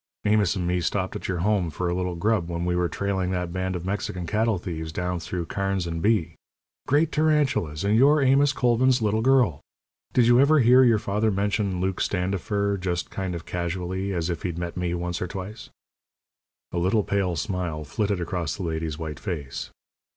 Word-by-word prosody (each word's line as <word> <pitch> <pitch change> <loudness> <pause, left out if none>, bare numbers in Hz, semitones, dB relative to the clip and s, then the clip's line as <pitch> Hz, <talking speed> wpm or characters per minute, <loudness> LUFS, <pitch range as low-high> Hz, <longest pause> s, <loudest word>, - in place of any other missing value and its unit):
Amos 105 -2 +3
and 90 -3 -2
me 90 0 0
stopped 95 +2 -1
at - - -5
your 90 -3 -2
home 100 -5 +2
for 90 +4 -3
a 85 - 0
little 90 0 -2
grub 95 -1 0
when 85 0 -2
we 90 0 0
were 90 -1 +1
trailing 95 -2 -1
that 90 -2 -2
band 95 0 -2
of 90 0 -5
Mexican 95 -2 -3
cattle 110 +3 +1
thieves 80 -3 -5
down 90 +1 -2
through 85 +1 -4
Karnes 95 0 -2
and 85 -1 -3
Bee. 105 -5 +1 0.5
Great 150 +3 +3
tarantulas! 145 - +1
and 100 +2 +2
you're 140 +6 +5
Amos 135 +1 +4
Colvin's 125 -1 +2
little 110 +1 +1
girl! 120 - +3 0.5
Did 125 - +4
you 120 +1 +5
ever 145 +3 +5
hear 125 0 +6
your 115 -3 +5
father 105 +1 0
mention 100 -1 0
Luke 95 0 -1
Standifer 100 +2 -1
just 85 -2 -2
kind 95 -2 -3
of 85 - -7
casually 90 +2 -3
as 85 -2 -1
if 85 - -4
he'd 85 -3 -3
met 85 -1 -4
me 90 -1 -1
once 90 +1 -3
or 90 - -1
twice?" 95 +3 -7 1.0
A 85 - -1
little 95 +5 +2
pale 95 -3 0
smile 85 -2 -3
flitted 100 +6 -1
across 85 -3 -2
the 100 - -6
lady's 80 -2 -3
white 80 -2 -6
face. 80 -10 -5
95 Hz, 195 wpm, -25 LUFS, 85-105 Hz, 1.0 s, hear